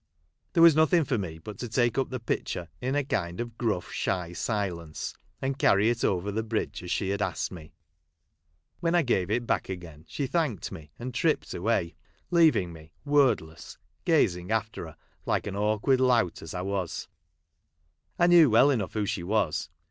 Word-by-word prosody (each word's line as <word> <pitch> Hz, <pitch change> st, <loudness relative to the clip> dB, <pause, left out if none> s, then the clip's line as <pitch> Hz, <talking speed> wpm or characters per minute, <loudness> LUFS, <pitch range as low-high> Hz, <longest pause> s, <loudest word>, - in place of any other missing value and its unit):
There 165 Hz, -, +5 dB
was 165 Hz, -3 st, +8 dB
nothing 160 Hz, +2 st, +4 dB
for 125 Hz, -4 st, -1 dB
me 85 Hz, -5 st, -5 dB
but 95 Hz, +5 st, -10 dB
to 120 Hz, -, -4 dB
take 120 Hz, +2 st, +1 dB
up 135 Hz, -, 0 dB
the 130 Hz, -, -4 dB
pitcher 90 Hz, -6 st, -3 dB
in 130 Hz, +2 st, -1 dB
a 145 Hz, -, +2 dB
kind 85 Hz, -9 st, -2 dB
of 120 Hz, -1 st, -4 dB
gruff, 110 Hz, -7 st, -2 dB
shy 90 Hz, -3 st, -2 dB
silence, 90 Hz, -6 st, -3 dB, 0.3 s
and 135 Hz, +1 st, -2 dB
carry 105 Hz, +1 st, +4 dB
it 120 Hz, -, -3 dB
over 95 Hz, +2 st, 0 dB
the 110 Hz, +2 st, -1 dB
bridge 110 Hz, 0 st, -3 dB
as 90 Hz, -, -8 dB
she 95 Hz, +1 st, -1 dB
had 100 Hz, +1 st, -1 dB
asked -, -, -1 dB
me. 80 Hz, -4 st, -11 dB, 1.0 s
When 170 Hz, 0 st, +1 dB
I 175 Hz, -, +4 dB
gave 95 Hz, -8 st, +1 dB
it 120 Hz, +3 st, +1 dB
her -, -, -10 dB
back -, -, -1 dB
again, 85 Hz, -5 st, -8 dB
she 140 Hz, -, -3 dB
thanked 140 Hz, -, -1 dB
me 75 Hz, -2 st, -9 dB
and 125 Hz, +1 st, -6 dB
tripped 155 Hz, +6 st, 0 dB
away, 90 Hz, -3 st, 0 dB, 0.4 s
leaving 150 Hz, -, +4 dB
me, 80 Hz, 0 st, -14 dB
word 145 Hz, -2 st, +4 dB
less, 80 Hz, -1 st, -12 dB, 0.3 s
gazing 90 Hz, +1 st, +2 dB
after 110 Hz, -5 st, -2 dB
her 80 Hz, -, -13 dB, 0.3 s
like -, -, 0 dB
an 100 Hz, -, -4 dB
awkward 110 Hz, +6 st, +2 dB
lout 120 Hz, -9 st, +2 dB
as 80 Hz, -, -8 dB
I 90 Hz, -, -2 dB
was. 95 Hz, -3 st, -3 dB, 1.1 s
I 175 Hz, -, +4 dB
knew 175 Hz, -4 st, +7 dB
well 120 Hz, +6 st, +6 dB
enough 110 Hz, -8 st, -1 dB
who 105 Hz, -2 st, 0 dB
she 95 Hz, -, -2 dB
was. 85 Hz, -5 st, 0 dB
110 Hz, 190 wpm, -28 LUFS, 90-130 Hz, 1.1 s, was